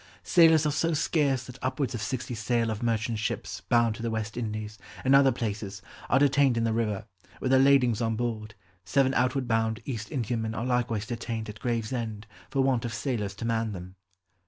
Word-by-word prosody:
"Sailors 160 -3 +5
are 150 - +2
so 160 +3 +1
scarce 140 -4 +1
that 125 +1 -11
upwards 130 +1 -1
of 120 - -4
sixty 125 +2 -3
sail 115 0 0
of 110 +1 -4
merchant's 115 -1 0
ships - - -3
bound 120 -2 +4
to 115 - -9
the 115 - -1
West 110 -1 -3
Indies, 110 -2 -4 0.3
and 135 - +4
other 135 -1 +6
places, 105 -5 -4 0.3
are 135 - +4
detained 140 -2 +4
in 115 - +1
the 115 -1 +1
river, 105 -4 -1 0.3
with 130 - -1
their 130 - +6
ladings 130 -4 +4
on 115 -1 0
board; 110 -3 -3 0.3
seven 130 +8 +2
outward 125 0 +1
bound 110 -1 +1
East 110 -6 -4
Indiamen 110 -3 -2
are 115 - -2
likewise 120 -4 0
detained 115 -1 -4
at 105 -1 -9
Gravesend, 115 -2 -3 0.2
for 135 0 +1
want 130 -3 +1
of 115 -2 -3
sailors 110 -5 -2
to 110 - -5
man 115 -2 0
them." 90 0 -8
115 Hz, 195 wpm, -28 LUFS, 110-130 Hz, 0.3 s, other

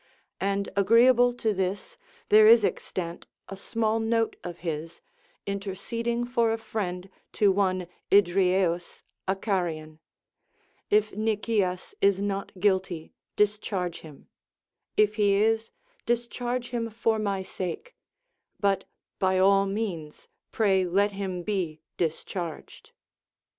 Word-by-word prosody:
And 200 +1 0
agreeable 235 +5 +5
to 220 -3 0
this, 190 +1 -3 0.3
there 215 +1 +8
is 225 -1 +7
extant 170 -3 -4 0.2
a - - -6
sraall 220 +3 -1
note 225 0 +1
of 175 -1 -7
his, 165 +1 -4 0.5
interceding 230 +4 -3
for 235 -2 +1
a 225 - 0
friend 195 -5 -4 0.3
to 205 -2 +4
one 185 -2 +1 0.2
Idrieus 180 -2 +2 0.2
a 190 - +2
Carian: 170 -6 -2 0.9
If 215 0 +3
Nicias 210 -3 -1
is 200 -1 +4
not 200 -1 -3
guilty, 185 -4 0 0.2
discharge 205 -4 0
him; 150 -3 -14 0.7
if 210 0 +3
he 205 -2 +4
is, 220 +2 +2 0.4
discharge 240 +1 -2
him 230 -2 -2
for 225 0 0
my 200 -2 -1
sake; 190 - -6 0.6
but 200 -2 +1 0.3
by 190 -1 +2
all 195 +1 +4
means 190 -7 -4 0.2
pray 195 -4 +2
let 200 +3 +2
him 190 -3 -4
be 175 -6 -2 0.2
discharged. 165 0 -4
200 Hz, 115 wpm, -27 LUFS, 185-220 Hz, 0.9 s, there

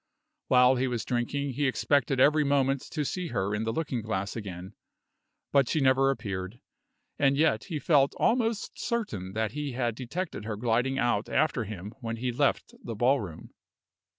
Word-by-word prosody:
While 125 0 +5
he 130 +1 +1
was 120 -3 -2
drinking 135 +3 -1
he 140 +3 0
expected 135 0 +1
every 150 +3 +5
moment 140 -1 +2
to 155 -4 -2
see 180 +4 -3
her 95 -7 -1
in 105 +2 -1
the 115 - 0
looking 140 -4 -2
glass 100 -2 -3
again; 95 -3 -7 0.8
but 140 -3 +3
she 155 - +1
never 135 0 +4
appeared 100 -4 -4 0.6
and 140 -1 +3
yet 145 -9 +2
he 160 - -4
felt 145 -2 +3
almost 230 -3 0
certain 155 - -3
that 110 0 -1
he 145 -2 -4
had 120 -2 -1
detected 135 - -5
her 110 0 -3
gliding 120 +4 +1
out 120 -5 0
after 130 -7 +1
him 100 -1 -7
when 115 -1 -3
he 125 +2 -2
left 140 +3 0
the 115 - -5
ballroom. 120 - 0
125 Hz, 170 wpm, -28 LUFS, 110-140 Hz, 0.8 s, While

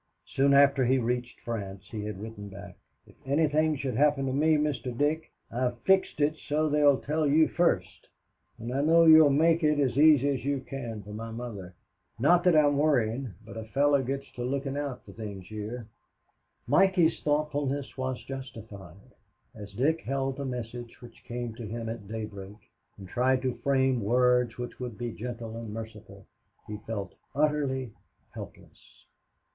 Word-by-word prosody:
Soon 140 +1 +2
after 140 -1 +5
he 130 +2 +3
reached 120 0 -2
France 100 -4 -6
he 105 -2 -4
had 105 -2 -5
written 105 -1 -8
back, 100 +1 -10 0.3
"If - - -19
anything 155 +2 +2
should 135 -2 -3
happen 145 -1 +3
to 130 - -1
me, 155 +3 +3
Mr. 140 -5 -2
Dick, 155 +3 0 0.2
I've 125 0 -1
fixed 190 +1 +2
it 150 +1 +2
so 155 +1 +1
they'd 145 -2 +3
tell 155 +1 0
you 155 +3 +5
first, 95 - 0 0.5
and 120 +2 -5
I 135 - +1
know 165 +3 +5
you'll 160 -2 +8
make 165 +4 +3
it 150 -1 +3
as 135 -2 +1
easy 145 -3 +6
as 135 -4 -2
you 140 -1 -1
can 120 -6 -6
for 105 +2 -10
my 115 +2 -6
mother. 110 -6 -7 0.4
Not 170 +9 +4
that 180 -3 +5
I'm 145 -2 +4
worrying, 125 - +1
but 110 - -10
a 110 - -5
fellow 140 +4 +2
gets 135 +2 -3
to 120 - -6
looking 135 +2 -2
out 145 -3 -4
for - - -11
things 100 -4 -8
here." 110 +3 -6 0.8
Mikey's 175 +3 +3
thoughtfulness 145 -2 -1
was 130 -1 -3
justified. 105 -9 -10 0.4
As 105 -2 -10
Dick 150 +10 +1
held 135 0 -2
the 140 - -4
message 120 -1 -6
which 120 -1 -14
came 120 -1 -5
to 115 -1 -8
him 115 +1 -5
at 115 -3 -7
daybreak 105 -2 -7 0.4
and 95 -2 -10
tried 130 +5 +1
to 130 -1 0
frame 130 -3 +1
words 125 +2 +2
which 120 0 -6
would 120 -4 -6
be 120 -1 -4
gentle 115 0 -6
and 115 -2 -6
merciful, 110 -1 -9 0.4
he 105 - -6
felt 100 -4 -4 0.2
utterly 140 -5 0 0.4
helpless. - - -13
130 Hz, 170 wpm, -28 LUFS, 115-145 Hz, 0.8 s, you'll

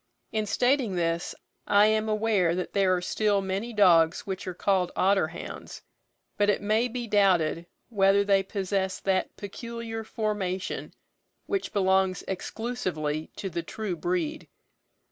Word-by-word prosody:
In 215 -1 -1
stating 245 -2 +1
this, 170 -1 -1 0.3
I 205 +1 +6
am 215 0 +2
aware 210 -6 +2
that 180 - -4
there 190 -2 +3
are 180 - -3
still 205 +2 +1
many 195 +4 -3
dogs 175 -6 +4
which 190 -1 -5
are 185 - -3
called 185 -1 +1
otter 195 -3 +3
hounds; 165 +2 -9 0.5
but 205 0 +3
it 205 - +2
may 215 +4 +1
be 245 0 -4
doubted 180 -6 +2 0.2
whether 200 -2 +4
they 200 -1 +3
possess 190 -1 -2
that 190 -1 0
peculiar 225 +2 -6
formation 210 -5 -3 0.5
which 395 -1 -2
belongs 190 -2 +2
exclusively 185 -7 -3
to 195 - -4
the 170 -2 -3
true 195 +2 -4
breed. 330 - -2
200 Hz, 140 wpm, -27 LUFS, 185-220 Hz, 0.5 s, I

